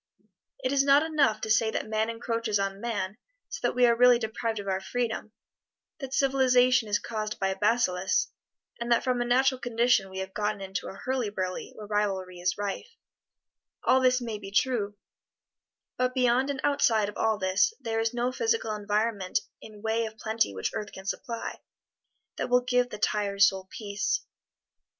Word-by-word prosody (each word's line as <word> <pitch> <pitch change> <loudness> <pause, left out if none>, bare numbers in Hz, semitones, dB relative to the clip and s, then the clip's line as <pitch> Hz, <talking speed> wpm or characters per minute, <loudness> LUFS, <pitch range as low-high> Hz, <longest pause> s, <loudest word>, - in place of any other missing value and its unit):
It 255 - 0
is 275 -1 +4
not 280 +2 +5
enough 290 -9 +2
to 220 - -4
say 220 0 +4
that 220 - -3
man 220 +1 0
encroaches 230 -2 -1
on 195 0 -2
man 215 -4 -3 0.3
so - - -5
that - - 0
we 250 0 +5
are 235 -1 +4
really 245 0 +6
deprived 225 0 -3
of 200 -1 -5
our 190 0 -1
freedom, 220 +1 -3 0.7
that 270 -3 -6
civilization 255 -4 +3
is 205 - +3
caused 215 -1 -4
by 195 - 0
a 190 - -1
bacillus, 190 -3 +1 0.5
and 235 0 -3
that 235 - +4
from 250 -1 0
a - - 0
natural 260 +2 +3
condition 235 -4 +2
we 190 - -9
have 190 0 -5
gotten 210 0 -1
into 190 -1 -5
a - - -7
hurly 250 +1 -2
burly 185 -2 -4
where 215 - -9
rivalry 195 -3 -1
is 180 +1 0
rife 205 - -5 0.9
all 260 +1 +4
this 255 0 +4
may 230 -4 -5
be 195 -1 -8
true, 205 -1 0 1.0
but 255 +1 0
beyond 255 +1 +3
and 275 -2 -3
outside 225 -7 +3
of 205 - -7
all 220 -1 +1
this 190 - +2
there 225 0 -2
is 225 0 +1
no 245 +1 -1
physical 450 - 0
environment 210 -1 0 0.2
in 215 -1 -12
way 225 +1 0
of 220 0 -11
plenty 220 - 0
which 95 - -2
earth 210 - -4
can 190 - -11
supply, 230 +4 -4 0.8
that - - -2
will 250 0 +4
give 250 0 +1
the 210 - -7
tired 200 -1 +1
soul 190 -2 +3
peace. 205 -3 -2
220 Hz, 180 wpm, -28 LUFS, 205-250 Hz, 1.0 s, really